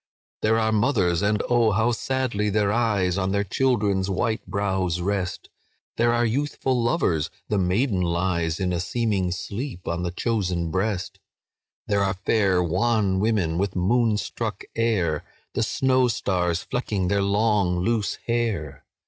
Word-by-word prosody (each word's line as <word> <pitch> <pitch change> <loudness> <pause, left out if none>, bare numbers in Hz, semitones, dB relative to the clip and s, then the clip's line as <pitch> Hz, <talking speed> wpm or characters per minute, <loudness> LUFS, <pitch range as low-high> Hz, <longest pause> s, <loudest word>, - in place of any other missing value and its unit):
"There 110 +1 +3
are 110 -1 +1
mothers—and 105 -3 +2
oh, 120 -3 +3
how 110 +4 +2
sadly 120 -3 -1
their 105 0 +1
eyes 100 -5 +1
On 95 0 0
their 100 0 +1
children's 100 -3 +1
white 110 +4 -1
brows 95 -4 -1
rest! 95 0 -2 0.5
There 120 +1 +3
are 120 0 +2
youthful 130 0 0
lovers—the 105 - -1
maiden 95 +3 +1
lies 85 -2 0
In 90 -2 0
a 85 - -1
seeming 100 -1 0
sleep 100 +3 -5
on 85 +1 -1
the 90 - -1
chosen 90 -4 -1
breast; 95 0 -2 0.7
There 100 -1 +1
are 95 -1 +1
fair 95 -1 +2
wan 95 +2 +1
women 95 -6 +1
with 100 0 -1
moon 110 +4 +2
struck - - -4
air, 95 -10 +1 0.3
The - - -1
snow 130 -1 +2
stars 90 -6 0
flecking 105 -7 -2
their 100 +1 +1
long 100 -2 +2
loose 105 +3 0
hair. 110 - -2
100 Hz, 140 wpm, -24 LUFS, 90-115 Hz, 0.7 s, There